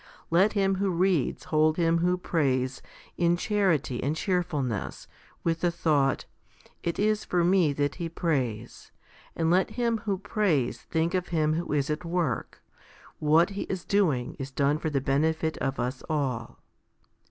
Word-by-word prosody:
Let 190 Hz, +5 st, +4 dB
him 195 Hz, -2 st, +1 dB
who 195 Hz, 0 st, 0 dB
reads 180 Hz, -5 st, +1 dB
hold 155 Hz, 0 st, +2 dB
him 165 Hz, -1 st, +2 dB
who 180 Hz, +1 st, +2 dB
prays 130 Hz, -7 st, 0 dB, 0.4 s
in 170 Hz, 0 st, +3 dB
chanty 180 Hz, -, 0 dB
and 145 Hz, +4 st, -1 dB
cheerfulness, 160 Hz, -, -2 dB, 0.4 s
with 165 Hz, -1 st, 0 dB
the 175 Hz, -, +3 dB
thought, 150 Hz, -5 st, +1 dB, 0.3 s
" -, -, -28 dB
It 170 Hz, -, -2 dB
is 215 Hz, +1 st, +1 dB
for 175 Hz, -1 st, +1 dB
me 175 Hz, -3 st, +4 dB
that 145 Hz, 0 st, 0 dB
he 165 Hz, -, -2 dB
prays 125 Hz, -10 st, -2 dB, 0.2 s
"; -, -, -26 dB
and 165 Hz, 0 st, +1 dB
let 185 Hz, +2 st, +3 dB
him 235 Hz, -2 st, +1 dB
who 205 Hz, -2 st, -2 dB
prays 180 Hz, -, 0 dB
think 165 Hz, +2 st, -1 dB
of 180 Hz, -1 st, 0 dB
him 155 Hz, -2 st, +1 dB
who 170 Hz, +2 st, -3 dB
is 145 Hz, 0 st, 0 dB
at 150 Hz, -, -3 dB
work, 165 Hz, -7 st, -2 dB, 0.3 s
" -, -, -24 dB, 0.2 s
What 160 Hz, +4 st, +4 dB
he 200 Hz, -, -4 dB
is 185 Hz, -2 st, -4 dB
doing 160 Hz, -12 st, +1 dB
is 135 Hz, 0 st, -4 dB
done 140 Hz, +2 st, +1 dB
for 160 Hz, -, -2 dB
the 140 Hz, -3 st, 0 dB
benefit 160 Hz, +4 st, +1 dB
of 135 Hz, 0 st, -2 dB
us 125 Hz, +2 st, -2 dB
all." 130 Hz, -7 st, -2 dB
165 Hz, 170 wpm, -27 LUFS, 140-180 Hz, 0.4 s, Let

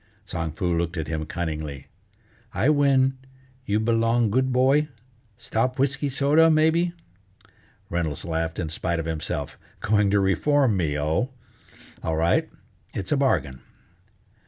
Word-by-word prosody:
Tsang 80 Hz, -5 st, -4 dB
Foo 90 Hz, -1 st, -1 dB
looked 85 Hz, +1 st, -2 dB
at 80 Hz, -, -3 dB
him 80 Hz, 0 st, -3 dB
cunningly: 75 Hz, -5 st, -4 dB, 0.7 s
"I 140 Hz, -, +2 dB
win, 135 Hz, -3 st, +3 dB, 0.5 s
you 105 Hz, +1 st, +1 dB
belong 115 Hz, 0 st, +2 dB
good 130 Hz, +3 st, +1 dB
boy? 135 Hz, +4 st, +3 dB, 0.5 s
Stop 125 Hz, +3 st, -1 dB
whisky 140 Hz, +1 st, 0 dB
soda, 145 Hz, +4 st, +4 dB
maybe?" 160 Hz, +2 st, +3 dB, 0.9 s
Reynolds 85 Hz, -1 st, -2 dB
laughed 80 Hz, -1 st, -2 dB
in 80 Hz, -4 st, -3 dB
spite 85 Hz, +1 st, -2 dB
of 80 Hz, -, -3 dB
himself: 75 Hz, -3 st, -4 dB, 0.2 s
"Going 105 Hz, -1 st, +2 dB
to 100 Hz, +1 st, +3 dB
reform 125 Hz, +5 st, +2 dB
me, 80 Hz, -5 st, 0 dB
oh? 80 Hz, -, 0 dB, 0.7 s
All 80 Hz, -, -1 dB
right, 85 Hz, +1 st, +2 dB, 0.5 s
it's 95 Hz, -2 st, -4 dB
a 150 Hz, -, +3 dB
bargain." 70 Hz, -, 0 dB
100 Hz, 135 wpm, -24 LUFS, 80-135 Hz, 0.9 s, soda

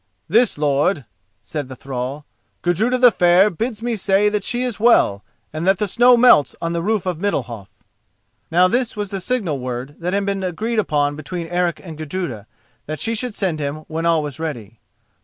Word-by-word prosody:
"This, 230 Hz, +3 st, +3 dB
lord," 145 Hz, +1 st, +1 dB, 0.4 s
said 150 Hz, -4 st, -5 dB
the 130 Hz, -, -9 dB
thrall: 135 Hz, +2 st, -5 dB, 0.4 s
"Gudruda 215 Hz, +9 st, +1 dB
the 250 Hz, -1 st, +6 dB
Fair 180 Hz, +2 st, +4 dB
bids 225 Hz, +4 st, -4 dB
me 240 Hz, -1 st, -1 dB
say 200 Hz, 0 st, +2 dB
that 210 Hz, -1 st, -2 dB
she 245 Hz, +3 st, -1 dB
is 245 Hz, -5 st, -3 dB
well 205 Hz, -, +4 dB, 0.3 s
and 155 Hz, +3 st, -3 dB
that 190 Hz, 0 st, +4 dB
the 210 Hz, -, -1 dB
snows 245 Hz, +5 st, +5 dB
melt 235 Hz, -, +5 dB
on 165 Hz, 0 st, -2 dB
the 170 Hz, -, -1 dB
roof 210 Hz, +1 st, 0 dB
of 180 Hz, -3 st, -2 dB
Middalhof." 120 Hz, -, -3 dB, 0.8 s
Now 180 Hz, +2 st, +4 dB
this 245 Hz, +4 st, 0 dB
was 205 Hz, -2 st, -4 dB
the 195 Hz, -1 st, -3 dB
signal 195 Hz, -, -1 dB
word 125 Hz, +2 st, -5 dB
that 180 Hz, +2 st, -2 dB
had 200 Hz, 0 st, 0 dB
been 200 Hz, -1 st, -2 dB
agreed 215 Hz, +6 st, -2 dB
upon 145 Hz, -7 st, 0 dB
between 165 Hz, +3 st, -5 dB
Eric 175 Hz, 0 st, -1 dB
and 160 Hz, -4 st, -9 dB
Gudruda, 155 Hz, -, -5 dB, 0.4 s
that 155 Hz, +1 st, -4 dB
she 230 Hz, -, -1 dB
should 230 Hz, 0 st, -3 dB
send 180 Hz, -6 st, -1 dB
him 150 Hz, +1 st, -4 dB
when 165 Hz, +1 st, -2 dB
all 165 Hz, -2 st, +2 dB
was 145 Hz, 0 st, -6 dB
ready. 115 Hz, -9 st, -6 dB
175 Hz, 195 wpm, -20 LUFS, 150-210 Hz, 0.8 s, the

